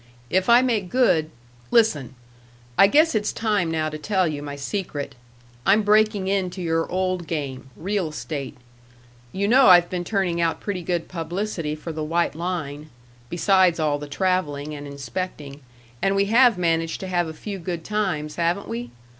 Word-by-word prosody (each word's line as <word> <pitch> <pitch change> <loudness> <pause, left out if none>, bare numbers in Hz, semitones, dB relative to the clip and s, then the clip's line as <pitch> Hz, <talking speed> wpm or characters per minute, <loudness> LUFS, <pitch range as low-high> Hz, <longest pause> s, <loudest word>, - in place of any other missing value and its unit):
If 190 +4 +1
I 240 +2 +7
make 220 -8 0
good 175 -11 +2 0.4
Listen: 155 - +2 0.6
I 195 - +7
guess 310 +9 +4
it's 210 -2 0
time 210 -6 0
now 160 -1 -1
to 155 0 -5
tell 190 +2 +1
you 150 -2 -3
my 145 -1 -6
secret. 145 -2 -4 0.5
I'm 205 +3 +4
breaking 210 -1 +3
into 190 -1 -1
your 165 -2 -1
old 185 -2 -1
game, 140 -5 -4
real 195 +1 -1
estate. 145 -2 -6 0.7
You 200 +1 -1
know 255 +4 +6
I've 175 -2 +7
been 180 -1 -2
turning 180 -3 0
out 165 -1 0
pretty 200 -3 -4
good 175 -1 -2
publicity 170 -2 -3
for 155 +2 -7
the 155 -1 -4
White 170 +3 0
Line, 155 -3 -4 0.4
besides 185 -1 +3
all 150 -2 +1
the 145 - -7
traveling 150 -3 -1
and 145 -1 -7
inspecting, 140 +1 -6 0.4
and 195 0 +2
we 200 0 +3
have 230 0 +5
managed 165 -2 0
to 190 - -5
have 175 -2 0
a - - -5
few 195 +5 -7
good 170 -1 -5
times, 180 -8 -2
haven't 175 +3 0
we? 120 +1 -5
175 Hz, 170 wpm, -23 LUFS, 155-195 Hz, 0.7 s, I